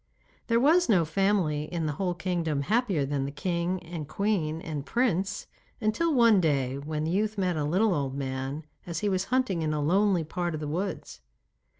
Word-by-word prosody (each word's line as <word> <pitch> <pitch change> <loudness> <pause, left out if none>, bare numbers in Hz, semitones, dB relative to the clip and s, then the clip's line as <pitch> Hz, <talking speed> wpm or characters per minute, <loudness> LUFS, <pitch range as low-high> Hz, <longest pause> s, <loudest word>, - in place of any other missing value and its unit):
There 230 0 +3
was 320 +5 +4
no 180 -6 +4
family 170 -4 +1
in 165 0 -3
the 150 - 0
whole 180 +4 -2
kingdom 165 -5 -1
happier 205 - +1
than 135 -1 -1
the 140 - -4
king 175 +4 -2
and 165 -3 -6
queen 170 -5 -1
and 155 -4 -5
prince, 195 - 0 0.3
until 230 +10 +1
one 230 -7 +5
day 140 -4 0
when 150 +1 -3
the 160 - -1
youth 210 +3 0
met 185 -3 +1
a 150 - -1
little 185 +8 +2
old 140 -4 -2
man 135 +2 -4 0.2
as 165 -2 -3
he 210 - +1
was 190 0 0
hunting 255 -8 0
in 155 -1 0
a - - -1
lonely 185 +3 +2
part 170 +1 -3
of - - -4
the 150 - -4
woods. 180 - -4
170 Hz, 195 wpm, -28 LUFS, 150-200 Hz, 0.3 s, one